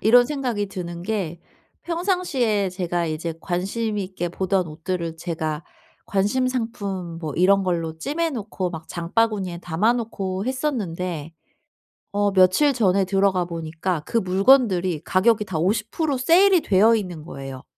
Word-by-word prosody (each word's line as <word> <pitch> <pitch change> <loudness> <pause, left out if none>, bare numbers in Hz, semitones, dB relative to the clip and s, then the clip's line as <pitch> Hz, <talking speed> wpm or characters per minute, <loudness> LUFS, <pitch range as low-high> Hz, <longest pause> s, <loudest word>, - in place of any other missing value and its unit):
이런 245 +3 +6
생각이 250 -8 -2
드는 175 -3 -6
게 180 -5 -3 0.4
평상시에 330 - 0
제가 175 -2 -2
이제 160 +1 -3
관심 205 +4 -2
있게 185 -2 -3
보던 185 +1 0
옷들을 165 +1 -4
제가 160 -2 -3 0.4
관심 210 +7 +1
상품 200 -8 -4
뭐 155 -4 -4
이런 195 +2 +4
걸로 165 -3 -2
찜해 325 - -1
놓고 205 - -3
막 160 -2 -8
장바구니에 185 0 -1
담아 180 +7 +1
놓고 195 -5 -3
했었는데 180 - -2 0.8
어 205 0 +1
며칠 190 +10 +5
전에 195 -6 +2
들어가 195 -1 +2
보니까 165 0 -3
그 230 - +1
물건들이 185 - +3
가격이 210 +3 +3
다 185 -5 -3
50% 215 - 0
세일이 350 +8 +5
되어 210 -1 +4
있는 180 -7 -5
거예요. 135 -4 -8
190 Hz, 285 characters per minute, -23 LUFS, 170-230 Hz, 0.8 s, 이런